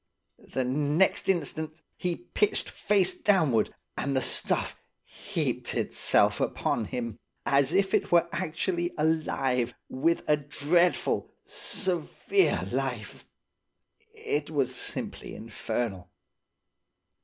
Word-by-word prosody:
The 130 - +1
next 150 +10 +1
instant 160 -2 -1
he 175 -1 -1
pitched 200 +4 -1
face 195 -3 +2
downward, 160 - +2 0.2
and 140 -1 -2
the 130 - +2
stuff - - +2 0.3
heaped - - -3
itself - - +3
upon 115 - 0
him, 115 0 -5 0.3
as 140 0 +3
if 190 +1 +2
it - - +1
were 170 0 +5
actually 175 0 -2
alive, 135 -6 0
with 160 +6 +1
a 150 - +4
dreadful, 150 +4 +1 0.2
severe 190 - 0
life. - - -4 0.9
It 155 - -2
was 140 -5 0
simply - - -2
infernal. 110 -3 -4
155 Hz, 100 wpm, -28 LUFS, 130-175 Hz, 0.9 s, were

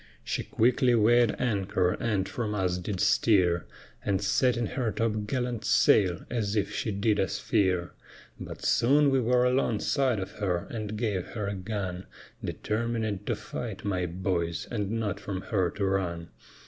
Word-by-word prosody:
She - - -2
quickly 125 +2 +2
weighèd 120 0 +4
anchor 95 -6 +1
and 100 -3 -1
from 110 -3 -3
us 90 -2 0
did 90 +1 -4
steer, 90 -7 +3 0.4
And 100 -2 +1
setting 120 +4 +2
her 120 -1 -2
top 110 -2 -1
gallant 125 -2 -2
sail 95 -4 +3
as 110 -4 -2
if 100 -2 0
she - - -2
did 105 +2 +1
us 95 - 0
fear, 90 -3 +1 0.5
But - - -8
soon 140 +4 +4
we 135 - +3
were 125 +1 +3
alongside 125 0 +1
of 95 - -5
her, 90 -4 -1
and 110 -2 -4
gave 105 -5 -1
her 105 -3 -2
a 100 - -2
gun, 95 -2 -4 0.4
Determinèd 110 -2 -2
to - - +1
fight, 110 -3 -6
my 90 -3 0
boys, 85 -2 -2
and 105 -5 -2
not 110 -3 -2
from 95 -2 -4
her 95 -5 0
to 100 +3 -3
run. 90 -3 -1
105 Hz, 160 wpm, -28 LUFS, 95-115 Hz, 0.5 s, weighèd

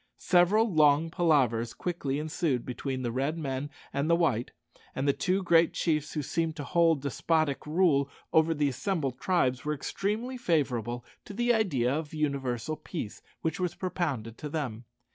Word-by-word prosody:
Several 190 +5 +4
long 155 +1 +4
palavers 130 -10 +2
quickly 155 -6 -2
ensued 150 -4 -1
between 130 +1 -4
the 120 - -1
red 135 +6 -1
men 140 -2 -3 0.2
and 140 +3 0
the 170 - +5
white, 155 -9 +1 0.5
and 135 +2 -1
the 140 - +4
two 190 +5 0
great 165 -2 +4
chiefs 155 -3 0
who 150 - -2
seemed 165 +3 -1
to 145 - -5
hold 165 -2 +2
despotic 150 +1 0
rule 150 -4 +3 0.2
over 160 +1 +4
the 145 -1 +2
assembled 140 -3 -2
tribes 130 -9 +1
were 150 0 -1
extremely 215 - -3
favourable 125 - 0 0.2
to 205 - -9
the 240 +2 +3
idea 140 - +1
of 155 +1 -4
universal 140 -2 -1
peace 150 - -6 0.2
which 160 +1 -1
was 180 -2 -1
propounded 140 - -3
to 150 - -5
them. 125 -7 -4
150 Hz, 160 wpm, -29 LUFS, 135-170 Hz, 0.5 s, the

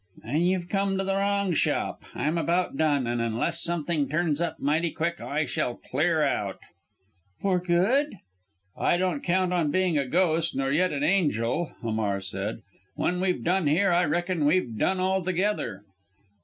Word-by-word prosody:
"Then 155 +3 0
you've 180 0 +1
come 195 0 0
to 195 - 0
the 195 0 -1
wrong 200 -1 +1
shop! - - 0
I'm 155 +3 0
about 175 -1 0
done, 145 -3 +2
and 120 0 -1
unless 115 +9 -1
something 165 -4 -1
turns 155 0 0
up 160 -2 -2
mighty 155 +4 +1
quick 170 +2 -3
I 150 +2 -1
shall 125 -2 -2
clear 155 +3 0
out." 105 -9 -1 0.8
"For 190 -2 +1
good?" 195 +10 +1 0.6
"I 175 - +2
don't 180 -5 0
count 180 +1 +1
on 170 -4 +1
being 180 -2 +2
a 140 - -1
ghost 165 +1 +1
nor 135 0 0
yet 180 +5 +2
an 145 -1 -2
angel," 155 - +1
Hamar 110 -3 -1
said; 100 +3 -5 0.3
"when 180 0 0
we've 185 -1 0
done 180 -1 +1
here, 180 +6 +3
I 175 +1 +3
reckon 175 0 0
we've 150 -8 +1
done 185 - +1
altogether!" 185 - 0
170 Hz, 165 wpm, -26 LUFS, 145-185 Hz, 0.8 s, here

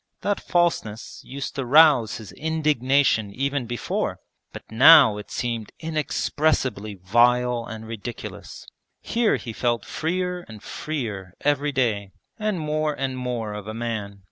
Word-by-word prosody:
That 205 0 0
falseness 165 -11 -1
used 140 +1 -6
to 135 - -3
rouse 135 -4 +5
his 110 -3 -10
indignation 140 -8 +1
even 140 -1 -1
before, 120 -1 -2 0.3
but - - -9
now 135 -2 +8
it 105 - -9
seemed 115 -3 -3
inexpressibly 150 -8 -1
vile 120 +5 +2
and 110 0 -8
ridiculous. 115 +1 -8 0.3
Here 230 -1 +1
he 115 - -6
felt 120 0 -1
freer 180 +2 -2
and 110 -1 -12
freer 105 - -5
every 145 0 +1
day 110 -8 -1 0.3
and 215 -4 -1
more 155 -1 -1
and 135 -1 -2
more 120 -4 -3
of 105 0 -7
a 110 - -5
man. 110 -4 -4
125 Hz, 135 wpm, -24 LUFS, 110-150 Hz, 0.3 s, now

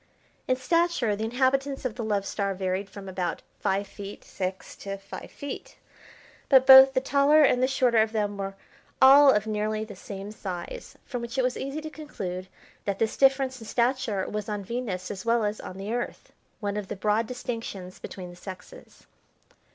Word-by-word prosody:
In 255 - +3
stature 260 -5 +1
the 215 +2 -3
inhabitants 270 +3 0
of 250 - -1
the 235 0 -5
Love 205 -2 0
Star 200 -1 -2
varied 190 +1 -2
from 195 0 -10
about 180 -2 -3 0.2
five 195 +1 0
feet 200 0 -9
six 190 0 -5
to 195 0 -5
five 195 0 -9
feet, 285 -1 -8 0.7
but 265 -2 +7
both 265 0 +10
the - - +5
taller 280 +3 +4
and 250 -3 +4
the 255 - +4
shorter 250 -3 +3
of 220 0 +3
them 205 -2 -1
were 195 0 -4 0.4
all 275 +2 +9
of 210 -3 +1
nearly 215 0 -1
the 210 -2 -10
same 195 +1 -8
size, 200 - -7
from 245 -3 -4
which 235 +2 -6
it 260 - +3
was 250 0 0
easy 275 +3 -4
to 310 0 -7
conclude 190 - -6 0.4
that 200 -1 -1
this 220 0 0
difference 265 -2 +3
in 225 - -9
stature 235 -5 0
was 210 0 -4
on 205 -1 -3
Venus 210 -4 -4
as 190 -2 -6
well 230 -1 +2
as 210 +1 -2
on 185 - -8
the 200 +3 -4
Earth, 240 0 -5 0.3
one 205 0 -2
of 205 -2 -4
the - - -4
broad 215 +3 +1
distinctions 225 -7 -6
between 180 -2 -8
the - - -13
sexes. 190 - -11
220 Hz, 190 wpm, -27 LUFS, 195-260 Hz, 0.7 s, both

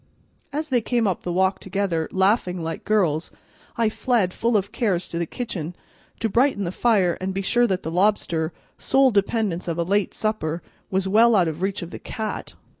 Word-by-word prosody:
As 305 +2 -3
they 250 -3 +2
came 235 0 +1
up 190 - -1
the 175 - -3
walk 190 +2 +2
together, 190 -4 -1
laughing 190 -2 +1
like 165 0 -4
girls, 175 -7 +1 0.5
I 230 -1 +3
fled, 215 -4 +1
full 230 -1 +2
of 200 0 -2
cares, 190 -7 0
to 170 - -3
the 170 - -1
kitchen, 180 -8 -5 0.5
to 225 - +2
brighten 235 -1 +2
the 175 - -2
fire 190 -5 +2
and 190 0 -2
be 195 - -1
sure 240 +4 +3
that 190 -3 -1
the 160 - -3
lobster, 175 -3 +1 0.3
sole 270 -1 +4
dependence 200 -3 0
of 165 -1 -2
a 170 - +1
late 200 +3 0
supper, 175 -7 -2 0.3
was 190 0 0
well 225 +4 +5
out 180 -4 +4
of 160 +1 -4
reach 195 0 -1
of 170 - -8
the - - -7
cat. 220 -1 -5
195 Hz, 195 wpm, -23 LUFS, 175-220 Hz, 0.5 s, well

